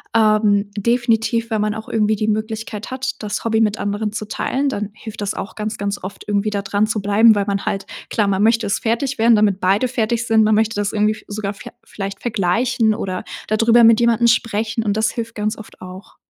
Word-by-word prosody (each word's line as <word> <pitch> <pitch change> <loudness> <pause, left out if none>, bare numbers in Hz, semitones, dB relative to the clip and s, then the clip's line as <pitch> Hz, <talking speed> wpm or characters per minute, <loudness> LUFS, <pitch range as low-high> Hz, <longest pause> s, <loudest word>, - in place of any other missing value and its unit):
ähm, 215 -2 +3
definitiv, 230 +1 0
wenn 215 -1 +1
man 210 0 -1
auch 220 0 -8
irgendwie 215 -1 +1
die 215 +1 -2
Möglichkeit 215 0 -3
hat, 260 0 -3
das 210 +1 -4
Hobby 225 -1 +2
mit 215 -1 +1
anderen 205 +1 -2
zu 215 0 -5
teilen, 275 +5 -1
dann 210 -6 -3
hilft 220 -1 -9
das 205 -1 -2
auch - - -6
ganz, 215 0 -4
ganz 200 -1 -3
oft 190 +2 -7
irgendwie 205 0 0
da 200 -1 -3
dran 205 +2 +1
zu 220 0 -1
bleiben, 210 +3 +5
weil 200 -1 0
man 200 -1 -2
halt 195 0 -2 0.2
Klar, 210 -3 +1
man 195 0 +1
möchte 225 0 +3
es 200 - 0
fertig 240 +4 -1
werden, 230 +1 +5
damit 205 -3 +2
beide 195 +6 +2
fertig 235 -1 -1
sind. 220 -1 +4
Man 215 0 +3
möchte 220 +1 +1
das 205 0 -1
irgendwie 210 0 +2
f 215 - -13
sogar 205 -1 -4
ver 200 - -11
vielleicht 195 -1 -7
vergleichen 225 +2 +1
oder 185 -3 -4 0.2
da 215 - +1
drüber 230 +1 +5
mit 225 -1 +6
jemandem 235 0 +3
sprechen, 225 -1 0
und 205 -2 0
das 220 0 +1
hilft 230 -1 -5
ganz 215 +1 -2
oft 220 - -13
auch. 185 +2 -11
215 Hz, 225 wpm, -19 LUFS, 205-225 Hz, 0.2 s, mit